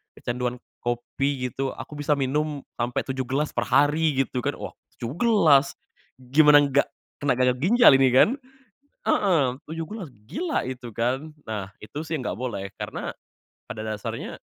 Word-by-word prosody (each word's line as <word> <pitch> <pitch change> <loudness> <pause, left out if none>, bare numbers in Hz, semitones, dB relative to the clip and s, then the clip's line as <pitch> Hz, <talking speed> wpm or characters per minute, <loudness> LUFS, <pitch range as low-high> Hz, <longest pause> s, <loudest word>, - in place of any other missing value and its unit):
kecanduan 125 0 -3 0.2
kopi 125 +2 -1
gitu? 135 +2 -3
Aku 150 - -9
bisa 145 0 0
minum 145 +2 0 0.2
sampai 120 +1 -1
7 130 0 -2
gelas 140 +4 -2
perhari." 145 -1 +3
Gitu 125 -2 -4
kan - - -2
wah, - - -7 0.2
7 120 +6 -4
gelas, 170 - +4 0.5
gimana 145 +3 +6
gak 140 +1 +3 0.4
kena 140 - +3
gagal 125 0 +3
ginjal 230 - +6
ini 135 -1 +5
kan? 130 - +6 0.7
Heeh, 145 -10 +2
7 165 +1 -4
gelas, 210 -6 -6 0.2
gila 330 +1 -1
itu 125 -2 -6
kan. 130 +6 -1
Nah 100 -3 -5
itu 145 +7 -7
sih 160 - -1
nggak 125 - -3
boleh, 100 -6 -4
karena - - -4 0.6
pada 110 -3 -6
dasarnya 110 -1 -5
135 Hz, 150 wpm, -25 LUFS, 125-150 Hz, 0.7 s, gimana